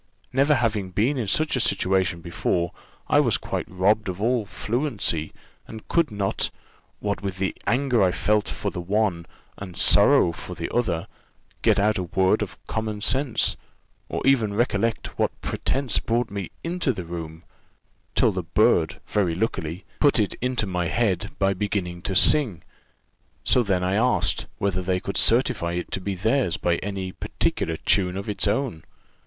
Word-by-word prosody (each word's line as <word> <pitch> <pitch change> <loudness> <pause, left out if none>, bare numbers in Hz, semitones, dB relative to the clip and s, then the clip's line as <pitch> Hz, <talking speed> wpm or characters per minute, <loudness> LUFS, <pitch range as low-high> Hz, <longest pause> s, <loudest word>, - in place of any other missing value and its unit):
Never 140 +3 +4
having 110 -6 0
been 115 +10 +1
in 115 - -2
such 155 +10 +1
a - - 0
situation 95 -5 +1
before, 85 0 -1 0.4
I - - +4
was - - +3
quite - - -4
robbed 100 +3 +1
of 90 0 -5
all 115 -1 +1
fluency, 105 - -1 0.4
and 110 -1 -10
could 170 -4 +2
not 100 -2 -1 0.5
what 100 -1 -2
with 95 -2 -4
the 95 0 -1
anger 125 0 +2
I 95 -2 +4
felt 105 +3 +1
for - - -3
the 90 - -5
one, 95 -3 0 0.3
and 95 -3 -8
sorrow 85 - +5
for - - -8
the - - -5
other 90 -9 0 0.6
get - - +3
out 105 0 +2
a - - -1
word 95 +2 +2
of - - -4
common 110 -2 -3
sense, 135 +2 +1 0.5
or - - -3
even 115 -7 +3
recollect 115 -1 -1
what - - 0
pretence 135 -5 0
brought 120 0 -1
me 100 -4 -4
into 170 -4 0
the 95 - -5
room, 80 -1 -7 0.7
till - - +4
the - - -2
bird - - +2
very 95 -6 0
luckily 90 -3 -3
put 145 -3 +4
it 105 -3 +1
into 125 -3 0
my 90 -3 -1
head 100 -4 0
by 95 0 +2
beginning 95 -3 -3
to 95 +1 -3
sing; 120 - +4 0.8
so 125 - +4
then 95 -5 0
I 90 +1 0
asked, 120 +5 +1
whether 95 -2 -1
they 90 0 0
could - - -5
certify 85 0 +2
it 90 0 -4
to 95 - -3
be 100 +1 -3
theirs 110 - +1
by 85 +2 +1
any 95 -2 -4
particular 80 -2 -1
tune 90 0 +1
of 100 - -5
its 105 -1 0
own? 115 - -1
100 Hz, 170 wpm, -24 LUFS, 90-115 Hz, 0.8 s, sorrow